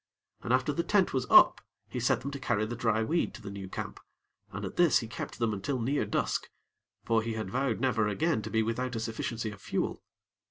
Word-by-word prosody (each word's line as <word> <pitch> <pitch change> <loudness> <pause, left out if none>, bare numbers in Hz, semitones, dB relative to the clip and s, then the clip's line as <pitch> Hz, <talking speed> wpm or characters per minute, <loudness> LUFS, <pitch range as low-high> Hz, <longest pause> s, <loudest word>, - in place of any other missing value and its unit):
And - - -3
after 130 +3 +2
the 170 - 0
tent 195 +1 +2
was 130 -1 0
up, - - +7 0.3
he 125 - -4
set 125 - +2
them 140 +2 -4
to 140 - -6
carry 110 -5 0
the 120 +2 -4
dry 110 -2 +1
weed 165 +9 0
to - - -10
the 100 - -6
new 100 -1 -7
camp, - - -6 0.5
and - - -5
at - - -6
this 175 -3 +5
he 115 - -3
kept 110 - -6
them 115 -2 0
until 125 +7 -2
near 130 +1 0
dusk; 105 - -1 0.6
for 115 -1 +3
he 115 +1 -3
had 110 -4 -4
vowed 130 -2 0
never 115 -4 +2
again 150 +4 +1
to 110 - -6
be 110 0 +2
without 125 +3 -2
a - - -1
sufficiency 115 0 -3
of 100 -1 -12
fuel. - - -2
115 Hz, 230 wpm, -30 LUFS, 110-130 Hz, 0.6 s, up